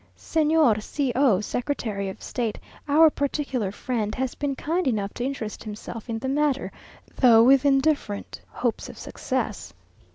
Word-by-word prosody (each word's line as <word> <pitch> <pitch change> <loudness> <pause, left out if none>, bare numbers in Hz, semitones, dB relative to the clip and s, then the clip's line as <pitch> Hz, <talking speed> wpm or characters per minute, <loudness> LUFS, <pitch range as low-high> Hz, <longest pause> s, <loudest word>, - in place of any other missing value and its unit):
Señor 310 -8 +2
C 275 +3 -2
o, 245 -8 +4
secretary 215 -5 -3
of 190 - -9
state, 230 -4 -3 0.3
our 310 +2 +6
particular 275 -8 -2
friend, 215 -1 -3
has 260 -1 -2
been 285 -2 -2
kind 335 +5 -1
enough 205 -5 -1
to 240 - -4
interest 250 -5 -4
himself 215 +2 -8
in 225 - -2
the 255 +4 -4
matter, 280 0 0 0.5
though 230 -3 +7
with 265 +2 +5
indifferent 275 -7 0
hopes 240 -2 -2
of - - -11
success. - - -4
255 Hz, 150 wpm, -25 LUFS, 220-285 Hz, 0.5 s, though